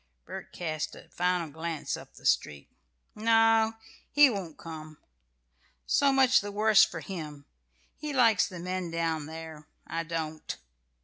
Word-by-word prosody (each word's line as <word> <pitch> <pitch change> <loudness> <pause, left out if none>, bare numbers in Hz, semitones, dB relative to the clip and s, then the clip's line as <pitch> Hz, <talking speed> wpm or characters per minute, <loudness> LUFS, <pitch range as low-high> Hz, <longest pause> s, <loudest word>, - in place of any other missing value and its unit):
Bert - - -8
cast 155 -2 -4
a - - -14
final 180 -3 0
glance 160 0 -3
up - - -12
the - - -15
street. 70 -1 +1 0.5
"No, 225 0 +4 0.4
he 290 -2 +7
won't 185 -7 -5
come 155 -2 -9
now. - - -40 0.8
So 280 -1 +3
much 265 -1 +5
the 205 0 -5
worse 215 +1 +5
for - - -1
him! 150 -7 -7 0.5
He 300 0 -4
likes 230 -7 +4
the 180 - -9
men 180 0 -3
down 165 -2 -1
there; 160 -1 -9 0.2
I 165 - -3
don't." 160 -2 -4
170 Hz, 145 wpm, -29 LUFS, 160-220 Hz, 0.8 s, he